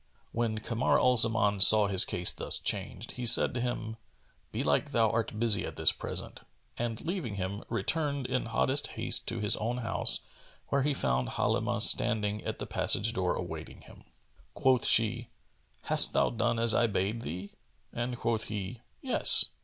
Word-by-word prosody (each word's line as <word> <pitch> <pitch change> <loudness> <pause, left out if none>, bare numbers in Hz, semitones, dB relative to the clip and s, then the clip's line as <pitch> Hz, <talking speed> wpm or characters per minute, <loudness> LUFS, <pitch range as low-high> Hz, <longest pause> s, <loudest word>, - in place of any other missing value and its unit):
When 115 -2 -3
Kamar 115 +3 -1
al 125 0 +2
Zaman 110 -3 +3
saw 105 +2 +7
his 95 -2 +5
case 90 0 -1
thus - - +4
changed, - - -4
he 125 -1 -5
said 115 - +6
to 120 - -4
him, 115 -2 -5 0.5
"Belike - - -2
thou 115 -2 +2
art 115 -1 -3
busy 110 -4 +4
at - - -7
this - - +4
present," - - -6 0.3
and 115 -1 -4
leaving 165 - -5
him, 100 +1 -5
returned 140 +5 -2
in 125 -1 -3
hottest 130 +5 -1
haste - - -2
to 115 -2 -2
his 105 - +1
own 120 +3 -3
house, 115 -2 -2 0.5
where 140 - 0
he 145 +1 -1
found 65 - -2
Halimah 115 +1 0
standing 105 -4 -1
at - - -5
the - - -7
passage 115 +3 +1
door 90 -5 -2
awaiting - - -8
him. - - -17 0.5
Quoth 130 -2 +1
she 115 +1 +1 0.5
"Hast - - +4
thou - - +1
done 115 0 -2
as 115 -1 +1
I 120 - +2
bade 105 +2 -3
thee?"; 95 0 -8 0.4
and 120 +1 -4
quoth 115 -2 -3
he, 105 +3 -7 0.2
"Yes." 260 - +7
115 Hz, 170 wpm, -28 LUFS, 105-120 Hz, 0.5 s, saw